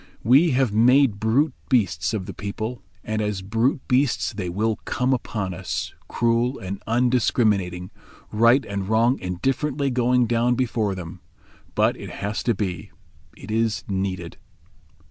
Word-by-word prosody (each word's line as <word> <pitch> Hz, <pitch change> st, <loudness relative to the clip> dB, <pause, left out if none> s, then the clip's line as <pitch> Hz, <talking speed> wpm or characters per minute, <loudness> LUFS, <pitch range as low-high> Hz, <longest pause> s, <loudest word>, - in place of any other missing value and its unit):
We 135 Hz, -, +5 dB
have 125 Hz, -4 st, +1 dB
made 120 Hz, 0 st, +4 dB
brute 130 Hz, +7 st, +2 dB, 0.2 s
beasts 90 Hz, -, +1 dB
of 105 Hz, -4 st, -3 dB
the -, -, -7 dB
people, 110 Hz, +4 st, -5 dB, 0.2 s
and 110 Hz, 0 st, -2 dB
as 105 Hz, -2 st, -2 dB
brute 115 Hz, +7 st, 0 dB
beasts 130 Hz, -1 st, +1 dB
they 95 Hz, -4 st, -4 dB
will 110 Hz, +5 st, 0 dB
come 125 Hz, +3 st, -1 dB
upon 105 Hz, -6 st, -3 dB
us, 85 Hz, -, -4 dB
cruel, 120 Hz, +2 st, +1 dB
and 95 Hz, +1 st, -6 dB
undiscriminating; 110 Hz, -7 st, +1 dB, 0.4 s
right 115 Hz, +5 st, +4 dB
and 100 Hz, -1 st, -4 dB
wrong 115 Hz, +4 st, +3 dB
indifferently 135 Hz, -, -1 dB
going 125 Hz, 0 st, +2 dB
down 120 Hz, +1 st, +1 dB
before 115 Hz, -5 st, 0 dB
them. 85 Hz, -3 st, -8 dB, 0.5 s
But -, -, +3 dB
it -, -, -8 dB
has 105 Hz, +1 st, -4 dB
to 120 Hz, -, +2 dB
be. 90 Hz, -5 st, -4 dB, 0.5 s
It 100 Hz, -, -9 dB
is 110 Hz, -1 st, 0 dB
needed." 95 Hz, -3 st, -3 dB
110 Hz, 145 wpm, -23 LUFS, 100-125 Hz, 0.5 s, We